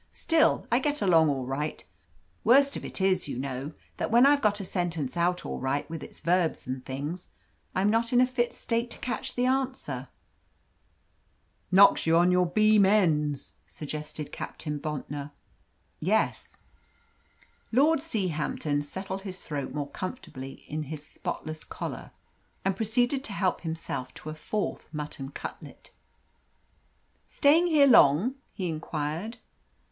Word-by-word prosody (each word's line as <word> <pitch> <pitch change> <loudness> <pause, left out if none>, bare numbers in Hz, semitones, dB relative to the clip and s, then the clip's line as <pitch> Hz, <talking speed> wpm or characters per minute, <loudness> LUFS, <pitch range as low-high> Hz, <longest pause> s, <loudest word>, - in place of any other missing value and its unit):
Still, 325 -1 +2
I 240 - +4
get 290 0 0
along 165 -5 +5
all 135 -3 -1
right. 140 +4 -3 0.6
Worst 275 +4 +5
of - - -4
it - - -4
is, 190 -3 +2
you 140 - -4
know, 135 +3 -4 0.2
that - - -2
when 240 +3 +6
I've 285 0 +5
got 210 -1 +2
a 195 - -4
sentence 170 -7 -2
out 175 +1 +1
all - - -4
right 135 +2 -1
with 165 - -5
its - - -10
verbs 175 -1 +1
and 130 0 -4
things, 145 +8 -5 0.5
I'm 195 +3 +3
not 230 +1 +2
in 245 - +5
a 255 - +6
fit 250 -1 -1
state 235 +1 -1
to - - -6
catch 240 -3 -3
the 245 - +1
answer." 255 - -1 1.6
"Knocks 195 -2 +6
you 165 +1 +5
on 175 +1 +5
to - - +3
your 180 0 +3
beam 215 +2 +5
ends," 155 -8 +2
suggested 150 0 -6
Captain 150 -2 -5
Bontnor. 145 -1 -5 0.7
"Yes." 210 +7 0 1.1
Lord 290 +7 +4
Seahampton 160 - -1
settled 190 +5 -5
his 190 -1 -8
throat 145 -3 -4
more 145 0 -4
comfortably 165 - -7
in 155 +1 -3
his 150 +1 -7
spotless 155 0 -6
collar, - - -6 0.6
and 195 -1 +1
proceeded 245 +6 +1
to 210 - -2
help 190 -2 0
himself 160 -6 -4
to 155 - -7
a - - -5
fourth 200 +7 -3
mutton 150 -3 -5
cutlet. - - -9 1.4
"Staying 320 +5 +4
here 305 -4 +5
long?" 220 - +6 0.2
he 185 -3 -2
inquired. 160 +6 -3
180 Hz, 145 wpm, -28 LUFS, 150-225 Hz, 1.6 s, when